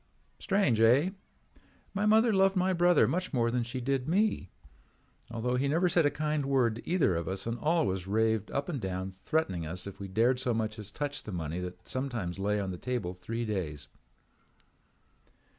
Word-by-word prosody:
"Strange, 190 - +2
eh? 130 +11 +5 0.8
My 205 +1 0
mother 220 +1 +5
loved 195 0 +4
my 185 0 +2
brother 175 -2 +4
much 180 +2 -1
more 115 -2 +2
than 125 0 0
she 120 +2 -4
did 130 0 -1
me, 195 - +1 0.8
although 120 +2 -1
he 135 +2 +1
never 165 +6 +2
said 165 -3 +4
a - - +3
kind 150 0 -1
word 125 -5 +2
to 120 - -9
either 165 - +2
of 85 0 -3
us 95 0 -3
and 115 +1 -3
always 150 - 0
raved 110 0 +1
up 140 - -2
and 150 -8 -3
down 95 0 -3
threatening 95 - -2
us 90 +3 -4
if 100 -1 -8
we 100 - -5
dared 115 +6 +2
so 125 -3 0
much 110 0 -2
as 105 -2 -7
touch 145 +6 -3
the 105 - -8
money 85 -1 -3
that 90 0 -7
sometimes 120 -9 -3
lay 105 +1 0
on 95 -2 -2
the 90 - -7
table 120 -8 -2
three 115 +6 -4
days. 90 -9 -4
120 Hz, 190 wpm, -30 LUFS, 95-150 Hz, 0.8 s, eh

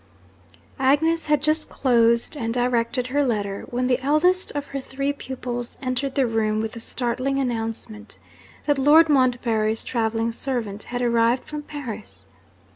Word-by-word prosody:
Agnes 310 +5 +2
had 300 -2 +2
just 310 +1 +2
closed 235 0 +2
and 230 -4 -3
directed 245 0 0
her 285 +3 +1
letter, 205 -6 -2
when 250 +1 -1
the 250 0 +2
eldest 335 +7 +2
of 290 -1 -3
her 275 - -1
three 275 +1 -3
pupils 245 -3 -5
entered 260 +1 -2
the 270 - +3
room 220 -2 0
with 220 0 -2
the 230 - -8
startling 255 +3 -1
announcement 225 -3 -4 0.5
that 290 -2 +1
Lord 310 +4 +6
Montbarry's 235 -5 +2
travelling 225 -1 -1
servant 225 -5 -3
had 245 0 -3
arrived 235 +1 +2
from 300 0 -6
Paris! 255 -8 -8
250 Hz, 145 wpm, -23 LUFS, 230-280 Hz, 0.5 s, Lord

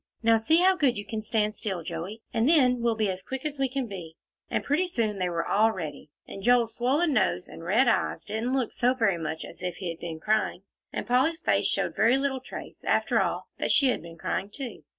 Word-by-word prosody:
Now 225 0 +5
see 300 +9 +3
how 375 +1 +5
good 270 - +2
you 205 - -5
can 220 -2 -4
stand 215 -1 0
still, 190 -6 -3
Joey, 175 +8 -6
and 230 +5 +2
then 255 -6 +5
we'll 235 -1 +2
be 215 -3 +1
as 185 0 -6
quick 265 +6 -6
as 295 -2 -3
we 270 -1 +1
can 265 0 -2
be." 180 -7 -8 0.3
And - - -1
pretty 315 +6 +1
soon 220 - -1
they 180 -1 0
were 170 -1 -2
all 220 +2 +3
ready, 155 -7 -6 0.2
and 195 - -8
Joel's 235 0 +3
swollen 285 +7 +2
nose 190 -5 +1
and 165 - -11
red 215 +9 +3
eyes 235 - +1
didn't 225 +4 -2
look 260 -4 0
so 250 +1 +2
very 200 -8 +1
much 160 0 -4
as - - -12
if 180 -1 -3
he 185 - -5
had 165 - -6
been 165 -2 -6
crying, 215 -1 0 0.3
and - - -4
Polly's 260 +9 +2
face - - +2
showed - - -1
very 230 +4 +4
little 270 -1 -1
trace, 255 - -9
after - - +2
all, - - -2
that - - 0
she 275 - +5
had - - 0
been 165 0 -11
crying, 195 +4 -2
too. 245 +1 -7
225 Hz, 235 wpm, -27 LUFS, 190-260 Hz, 0.3 s, Now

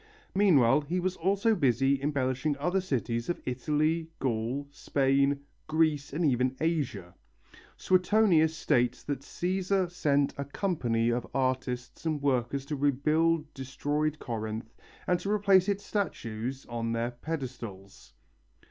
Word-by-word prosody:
Meanwhile 150 - +5
he 170 +5 -2
was 185 +1 -1
also 200 +5 +2
busy 135 - +2
embellishing 140 0 0
other 180 +7 0
cities 120 -7 -2
of 175 - -1
Italy, 155 +5 0
Gaul, 125 +2 -2
Spain, 140 0 +1 0.3
Greece, 155 -2 +1
and 165 +4 0
even 130 -1 +2
Asia. 140 - -1 0.6
Suetonius 180 -4 +3
states 125 -3 +1
that 145 -3 -3
Cæsar 185 +4 -1
sent 145 -5 +1
a 140 - -2
company 120 - 0
of 120 0 -2
artists 130 -2 -2
and 155 -2 -1
workers 135 -1 0
to 150 - -3
rebuild 150 +3 +1
destroyed 145 +3 -2
Corinth 110 -2 -5 0.3
and 180 -1 +2
to 195 - -4
replace 200 -2 +4
its 200 0 -1
statues 130 - -3
on 115 -1 -3
their 115 +1 -1
pedestals. 120 - -7
140 Hz, 125 wpm, -29 LUFS, 125-165 Hz, 0.6 s, Meanwhile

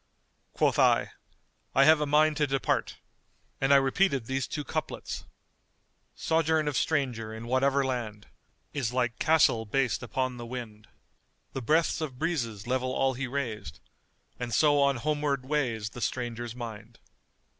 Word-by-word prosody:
Quoth - - +2
I, - - +4 0.6
I 135 - +6
have 155 -1 +6
a 150 - 0
mind 150 +1 +4
to 150 -2 +2
depart; 135 0 -1 0.6
and 135 +1 +2
I - - +8
repeated 135 0 +2
these 130 +1 -2
two 150 - -4
couplets:— - - -4 0.9
Sojourn 160 - +1
of 145 - -1
stranger, 125 -9 0
in 110 +1 -7
whatever 135 +3 +2
land, 115 -5 -4 0.3
* - - -43
Is 125 -6 -1
like 125 -2 -1
the - - 0
castle 145 -8 +4
based 130 +1 0
upon 130 +1 -2
the 120 - -7
wind: 115 -4 -7 0.7
The 135 - -3
breaths 160 +7 +2
of 140 -5 -4
breezes 120 - -2
level 130 +1 -1
all 135 0 +1
he 130 +1 -3
raised. 120 -6 -4 0.3
* - - -41
And 120 -3 -2
so 145 +1 +4
on 140 -1 +3
homeward 145 0 -1
way's 120 -7 -1
the 125 - -9
stranger's 120 -2 -3
mind. 115 -4 -8
130 Hz, 155 wpm, -28 LUFS, 120-145 Hz, 0.9 s, I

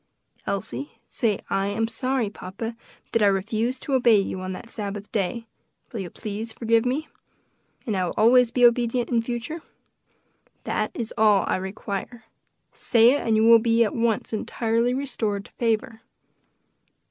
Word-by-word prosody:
"Elsie, 145 -8 -4
say 215 -4 0
'I 195 0 +1
am 225 +3 0
sorry, 255 +1 0
papa, 225 +5 -6 0.4
that 230 - +1
I 205 - +5
refused 220 +6 0
to 280 - -3
obey 240 -5 +5
you 190 -1 -3
on 185 0 -4
that 185 - -9
Sabbath 205 -2 -6
day; 215 +3 -2 0.5
will 225 - -4
you 185 -3 -5
please 215 +4 -6
to 220 - -12
forgive 230 +1 +2
me? 290 +5 -1 0.8
and 220 -5 -1
I 185 -1 +1
will - - -4
always 245 +2 +5
be 245 +1 +4
obedient 240 +1 +2
in 235 -1 +3
future,' 240 +7 -5 1.0
That - - -1
is 230 -2 -4
all 210 -2 +5
I - - 0
require. 200 +4 -5 0.5
Say 230 0 +4
it, 285 - +1
and 225 -1 +1
you 215 - +3
will 230 0 +8
be 230 +1 +3
at 215 - -1
once 230 -1 0
entirely 230 +2 0
restored 220 -7 -2
to - - -16
favor." 225 -1 -1
225 Hz, 165 wpm, -24 LUFS, 205-240 Hz, 1.0 s, will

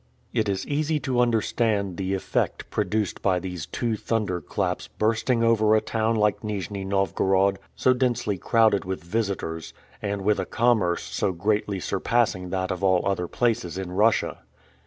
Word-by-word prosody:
It 110 -2 +1
is 95 -1 -1
easy 150 +1 0
to 130 -2 0
understand 110 -5 +1
the 95 0 -1
effect 95 - -2
produced 105 -1 -1
by 95 -2 +2
these 90 -4 -5
two 120 -3 -1
thunder 105 -5 -1
claps 90 -3 -2
bursting 115 +2 +1
over 110 -2 +4
a - - +5
town 110 +1 0
like 105 -1 +2
Nijni 100 -2 -4
Novgorod, 95 0 +1 0.2
so 130 - +3
densely 120 -6 0
crowded 110 -4 +3
with 95 -3 -4
visitors, 90 -5 -3 0.3
and 100 -1 -2
with 105 +1 +2
a - - -1
commerce 110 -8 +2
so 95 - -1
greatly 100 +2 0
surpassing 95 -3 0
that 95 0 -1
of 95 +1 -4
all 95 -2 +3
other 95 -3 0
places 115 -7 0
in 95 -2 -4
Russia. 105 +4 +2
100 Hz, 155 wpm, -25 LUFS, 95-115 Hz, 0.3 s, a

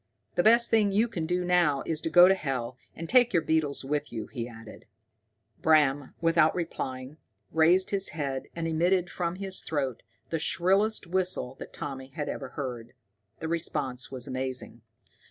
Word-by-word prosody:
The 175 - +2
best 235 +4 +5
thing 215 -3 +4
you 215 +4 +3
can 170 -8 -4
do 180 +1 0
now 175 -6 +2
is 160 -1 -2
to - - -2
go 175 +2 +8
to 190 - +5
hell, 130 -8 -3 0.2
and 165 - -6
take 245 +1 +4
your 170 -3 +3
beetles 155 -4 0
with 145 +1 -2
you," 110 -2 -4
he 120 -3 -6
added. 115 -2 -12 0.8
Bram, 145 -3 +3
without 165 -1 +3
replying, 135 -5 -5 0.3
raised 170 +4 +4
his 195 -1 +1
head 140 -4 -4
and 165 -1 -2
emitted 175 +3 +1
from 170 -1 -2
his 190 0 -2
throat 135 -6 -2 0.3
the 165 - 0
shrillest 195 +7 +1
whistle 180 -7 -1
that - - -8
Tommy 135 -2 -6
had 145 +2 -5
ever 135 - -5
heard. 125 -4 -5 0.5
The 160 - -3
response 145 -6 -1
was 130 -2 -4
amazing. 130 -2 -4
160 Hz, 170 wpm, -28 LUFS, 135-180 Hz, 0.8 s, go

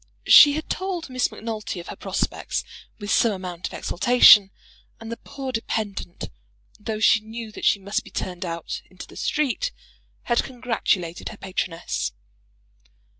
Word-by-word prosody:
She 290 -1 +9
had 310 +1 -4
told 365 -6 -3
Miss 255 0 0
Macnulty 215 -4 -5
of 170 - -9
her - - -6
prospects, - - -2 0.3
with 205 -1 -5
some 230 - +4
amount 180 -2 -5
of - - -12
exultation; 210 -1 +6 0.5
and 225 0 -8
the 230 - -4
poor 270 -2 -7
dependant, 215 -6 -4 0.5
though 215 0 -4
she 220 - +5
knew 220 +1 -8
that - - -6
she - - +5
must 200 +1 -2
be - - -13
turned 180 -1 -4
out 170 -2 -5
into 185 - -10
the - - -16
street, 305 - -1 0.5
had 240 -1 +1
congratulated 225 -9 -2
her 215 - -10
patroness. 180 - -3
220 Hz, 150 wpm, -24 LUFS, 185-245 Hz, 0.5 s, She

